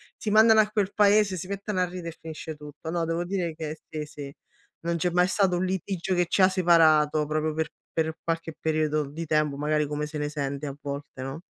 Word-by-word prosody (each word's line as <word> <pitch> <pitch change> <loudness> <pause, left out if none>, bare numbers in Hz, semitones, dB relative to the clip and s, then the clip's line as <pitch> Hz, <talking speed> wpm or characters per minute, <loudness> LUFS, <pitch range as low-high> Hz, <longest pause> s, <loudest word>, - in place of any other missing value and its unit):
si 215 - -4
mandano 220 +1 +6
a 210 - +4
quel 205 -2 -1
paese, 205 -2 +4
si 180 - -6
mettono 200 0 -3
a 180 - +3
ridere 175 -1 -6
e 165 - -11
finisce 160 0 -6
tutto. 150 +2 -8
No, 170 -1 0
devo 165 +1 -1
dire 175 -3 -2
che 155 -1 -5
sì, 155 -1 -4
sì, 145 -2 -8 0.5
non 170 0 -1
c'è 180 +2 +1
mai 180 +1 +3
stato 190 -2 +2
un 185 - 0
litigio 190 0 -2
che 175 -1 +2
ci 190 - +3
ha 185 - +7
separato 155 -4 +4
proprio 155 +1 -1
per 160 -1 -1 0.2
per 160 -1 0
qualche 165 -1 -3
periodo 155 -1 0
di 165 +3 -5
tempo, 150 -2 +1
magari 150 +1 +1
come 150 +1 -2
se 150 0 -6
ne 145 0 -2
sente 140 -1 -3
a 135 - -5
volte, 140 -2 -6
no? 135 +5 -6
160 Hz, 225 wpm, -26 LUFS, 150-185 Hz, 0.5 s, ha